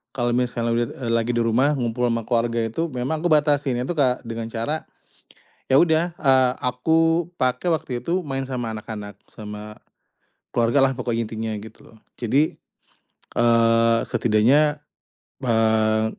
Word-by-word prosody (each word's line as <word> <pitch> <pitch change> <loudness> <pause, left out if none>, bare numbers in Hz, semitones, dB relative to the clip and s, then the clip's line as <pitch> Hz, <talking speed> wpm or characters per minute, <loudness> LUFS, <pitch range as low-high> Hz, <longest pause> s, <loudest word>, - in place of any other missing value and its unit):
kalo 120 -2 0
misalnya 120 -1 -1
lag 115 - +1
eee, 120 -1 -5
lagi 115 +1 +1
di 120 - +2
rumah 130 +6 +2
ngumpul 125 -1 -1
ama 115 -1 -1
keluarga 115 0 0
itu 115 +10 -2
memang 135 +2 -3
aku 175 - 0
batasin 145 -3 +2
itu 130 - -3
Kak 130 -4 +1
dengan 115 -1 -5
cara, 115 +7 -4 0.8
ya 135 +4 +5
udah, 165 +1 +2
eee, 130 -3 +4
aku 165 +6 +2 0.2
pakai 130 +7 +1
waktu 130 -6 -3
itu 180 +2 0
main 135 -4 -4
sama 120 -4 -4
anak-anak 105 -2 -8
sama, 105 0 -10 0.7
keluargalah 130 +3 +2
pokoknya 115 -3 -2
intinya 110 0 -4
gitu 110 - -13
loh. 110 - -18 0.2
Jadi, 135 +6 +1 0.8
eee, 115 0 +4
setidaknya, 120 +7 +3 0.7
eee, 110 -2 +2
120 Hz, 140 wpm, -23 LUFS, 115-140 Hz, 0.8 s, ya